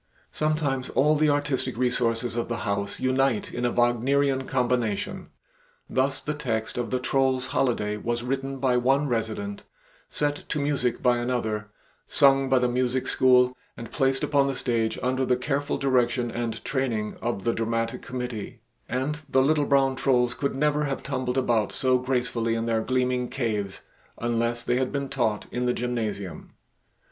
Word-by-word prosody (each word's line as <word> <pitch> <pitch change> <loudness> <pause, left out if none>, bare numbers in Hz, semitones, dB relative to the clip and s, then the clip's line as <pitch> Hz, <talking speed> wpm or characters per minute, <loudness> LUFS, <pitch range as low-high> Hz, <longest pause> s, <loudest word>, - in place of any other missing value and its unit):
Sometimes 150 -4 -1
all 150 +3 +3
the 155 0 +3
artistic 145 -4 0
resources 120 -1 0
of 120 - -1
the 115 0 -4
House 100 -1 -2
unite 130 -3 +1
in 125 - -2
a 120 - +2
Wagnerian 130 +3 +2
combination; 120 -5 -1 0.6
thus, 135 +1 +1
the 150 - -2
text 115 -7 -2
of 120 -1 -2
the 130 - 0
"Troll's 130 0 +1
Holiday" 105 -5 +1
was 120 +2 -2
written 135 +2 -2
by 130 -2 +2
one 135 +4 +2
resident, 110 -4 -2 0.5
set 145 0 -1
to 150 - -1
music 140 -4 0
by 125 -1 +4
another; 110 -4 -2 0.4
sung 135 -1 +4
by 135 - +4
the 125 0 +3
Music 125 +1 0
School, 125 -1 +4 0.2
and 115 -1 -8
placed 135 +1 +1
upon 140 -2 +3
the 135 - -1
stage 115 -3 0
under 130 +1 +1
the 125 -1 +2
careful 140 +2 -1
direction 125 -2 +1
and 115 -1 -4
training 120 -6 -1
of 115 -5 -2
the 115 - +1
dramatic 115 0 -1
committee; 125 -2 -5 0.3
and 140 +5 -2
the 130 0 +4
little 150 +1 +2
brown 135 -1 +3
trolls 125 -3 +2
could 140 -2 -2
never 150 +1 +1
have 140 -1 -3
tumbled 130 -2 -2
about 120 -4 +1
so 130 -1 +2
gracefully 125 -3 0
in 115 0 -1
their 115 -1 +1
gleaming 125 0 0
caves 105 -6 -3 0.3
unless 115 0 -1
they 120 +1 +1
had 130 0 0
been 140 -1 -2
taught 110 -5 0
in 125 0 -1
the 125 - +2
gymnasium. 110 -7 -4
125 Hz, 165 wpm, -26 LUFS, 115-135 Hz, 0.6 s, by